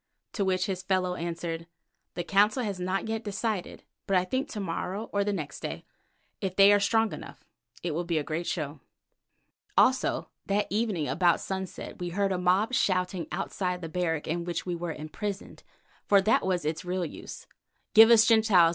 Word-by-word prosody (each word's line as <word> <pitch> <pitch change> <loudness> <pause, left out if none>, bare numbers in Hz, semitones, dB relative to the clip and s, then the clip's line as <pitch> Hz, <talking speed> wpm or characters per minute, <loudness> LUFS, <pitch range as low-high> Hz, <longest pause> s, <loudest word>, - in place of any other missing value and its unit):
to 200 - 0
which 185 -1 +1
his 190 -3 -3
fellow 185 -1 0
answered, 165 -1 -4 0.5
"The 175 - -2
Council 205 +7 +3
has 200 -4 -3
not 185 +3 -1
yet 225 0 -2
decided, 205 -2 -3 0.2
but 195 - +3
I 180 - +2
think 260 +8 -2
to 215 - -5
morrow 195 +3 -4
or 200 0 +2
the 205 - 0
next 155 -8 -4
day, - - -6 0.6
if 185 -1 -2
they 200 +1 +7
are 205 - +5
strong 225 +2 +2
enough. - - -10 0.4
It 175 - -1
will 165 +4 -1
be 170 -2 -1
a 150 - 0
great 165 +3 -3
show." 150 -3 -3 1.0
Also - - +3 0.2
that 200 +1 +1
evening, 205 -8 0
about 175 -2 +3
sunset, 190 -2 -5
we 175 -1 -3
heard 195 +2 0
a 185 - 0
mob 185 +7 +2
shouting 185 -5 +1
outside 180 -2 -2
the 165 - -4
barrack 165 -3 -1
in 170 +2 -1
which 175 0 -3
we 180 - -2
were 170 0 -3
imprisoned, 190 +7 -6 0.5
for 200 - +6
that 215 +3 +3
was 180 -4 0
its 155 0 -2
real 180 0 -2
use, 155 - -9 0.5
"Give 225 0 +9
us 230 -1 +7
the 225 - +7
Gentiles! 190 -7 +5
185 Hz, 190 wpm, -28 LUFS, 175-205 Hz, 1.0 s, Give